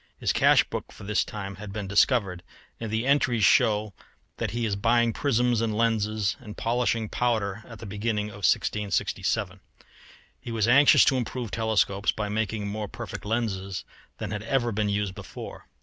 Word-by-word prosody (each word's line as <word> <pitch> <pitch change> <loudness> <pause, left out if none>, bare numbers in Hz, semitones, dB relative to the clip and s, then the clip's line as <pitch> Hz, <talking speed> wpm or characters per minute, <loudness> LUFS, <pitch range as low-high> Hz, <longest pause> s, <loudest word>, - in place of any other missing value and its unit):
His - - +1
cash - - +5
book - - -6
for - - -13
this 105 +1 +1
time 100 -2 -7
has 105 +1 -8
been 100 0 -5
discovered, 100 -3 +2 0.4
and 115 - -4
the 110 +3 -1
entries 130 -5 +2
show 105 +1 +3 0.4
that - - -2
he 120 0 -2
is 105 -3 0
buying 115 +3 +2
prisms 120 -3 +1
and 110 -2 -1
lenses 110 -2 +1
and 105 -5 -10
polishing 115 -1 0
powder 110 -3 -1
at 115 - -10
the 110 - -9
beginning 105 +1 -2
of 100 - -11
1667. 100 -1 0 0.8
He - - -9
was 115 -1 +1
anxious 140 +4 +7
to 135 - +3
improve 120 -2 -4
telescopes 105 -3 +1
by 105 -1 -4
making 110 0 -2
more 105 +1 -4
perfect - - -7
lenses 100 -4 -2 0.3
than - - -5
had 105 -1 -3
ever 120 +1 0
been 105 0 0
used 100 -1 -1
before. 100 -1 -9
110 Hz, 170 wpm, -26 LUFS, 100-115 Hz, 0.8 s, anxious